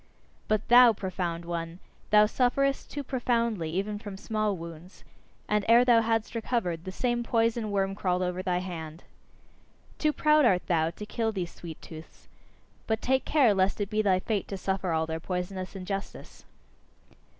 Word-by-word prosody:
But 215 Hz, 0 st, 0 dB
thou, 240 Hz, -1 st, +8 dB
profound 180 Hz, -4 st, -4 dB
one, 170 Hz, 0 st, -4 dB, 0.3 s
thou 210 Hz, 0 st, +6 dB
sufferest 270 Hz, +4 st, 0 dB
too 285 Hz, -, -5 dB
profoundly 235 Hz, -, -1 dB
even 200 Hz, +5 st, -2 dB
from 205 Hz, -3 st, -8 dB
small 215 Hz, -1 st, -1 dB
wounds; 170 Hz, +2 st, -11 dB, 0.4 s
and 210 Hz, -1 st, +1 dB
ere 235 Hz, +2 st, +6 dB
thou 235 Hz, -2 st, +5 dB
hadst 225 Hz, 0 st, -1 dB
recovered, 220 Hz, -8 st, -2 dB
the 185 Hz, -, -5 dB
same 240 Hz, +4 st, -1 dB
poison 230 Hz, -1 st, 0 dB
worm 195 Hz, -1 st, 0 dB
crawled 185 Hz, -2 st, -1 dB
over 180 Hz, 0 st, -2 dB
thy 180 Hz, -1 st, 0 dB
hand. 165 Hz, -3 st, -6 dB, 1.0 s
Too 305 Hz, -, +2 dB
proud 300 Hz, 0 st, +3 dB
art 185 Hz, -8 st, +3 dB
thou 160 Hz, -2 st, +1 dB
to 190 Hz, +5 st, -8 dB
kill 225 Hz, +1 st, -1 dB
these 185 Hz, -5 st, -4 dB
sweet 165 Hz, -3 st, -9 dB
tooths. 160 Hz, 0 st, -12 dB, 0.6 s
But 220 Hz, 0 st, 0 dB
take 265 Hz, +2 st, +1 dB
care 270 Hz, -8 st, +4 dB
lest 190 Hz, +1 st, +1 dB
it 205 Hz, -1 st, -3 dB
be 215 Hz, 0 st, +2 dB
thy 195 Hz, -3 st, +3 dB
fate 205 Hz, +1 st, -2 dB
to 195 Hz, -, -5 dB
suffer 190 Hz, -1 st, -2 dB
all 160 Hz, 0 st, +1 dB
their 160 Hz, 0 st, -4 dB
poisonous 185 Hz, +2 st, -4 dB
injustice! 195 Hz, +1 st, -6 dB
200 Hz, 165 wpm, -28 LUFS, 180-230 Hz, 1.0 s, thou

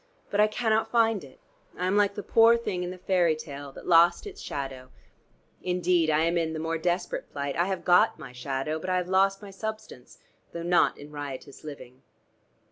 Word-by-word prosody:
But 205 Hz, -, 0 dB
I 210 Hz, -, +6 dB
cannot 220 Hz, 0 st, 0 dB
find 225 Hz, -5 st, +2 dB
it. 135 Hz, -2 st, -15 dB, 0.4 s
I 180 Hz, -, -2 dB
am 185 Hz, +2 st, +1 dB
like 205 Hz, -1 st, +3 dB
the 205 Hz, -, -5 dB
poor 230 Hz, +1 st, +5 dB
thing 190 Hz, -6 st, -3 dB
in 180 Hz, -, -3 dB
the 185 Hz, -, -7 dB
fairy 180 Hz, -3 st, +2 dB
tale, 145 Hz, -3 st, -8 dB
that -, -, -11 dB
lost 170 Hz, -, +5 dB
its 410 Hz, 0 st, -9 dB
shadow. 135 Hz, -2 st, -6 dB, 0.7 s
Indeed 180 Hz, -2 st, +1 dB
I 155 Hz, 0 st, +3 dB
am 170 Hz, +1 st, +2 dB
in 160 Hz, -1 st, -1 dB
the 160 Hz, -, -4 dB
more 165 Hz, +1 st, -2 dB
desperate 175 Hz, +2 st, -2 dB
plight, 140 Hz, -1 st, -3 dB
I 175 Hz, -, +2 dB
have 190 Hz, 0 st, -3 dB
got 180 Hz, 0 st, +4 dB
my -, -, -10 dB
shadow, 135 Hz, +4 st, -3 dB
but 185 Hz, -, -5 dB
I 185 Hz, -, +2 dB
have 180 Hz, 0 st, -2 dB
lost 195 Hz, +2 st, +2 dB
my 200 Hz, -, -9 dB
substance, 215 Hz, -, -7 dB, 0.4 s
though 170 Hz, -, -5 dB
not 175 Hz, +1 st, +3 dB
in 145 Hz, +1 st, -11 dB
riotous 145 Hz, -1 st, -8 dB
living." 130 Hz, -4 st, -10 dB
175 Hz, 205 wpm, -27 LUFS, 150-195 Hz, 0.7 s, I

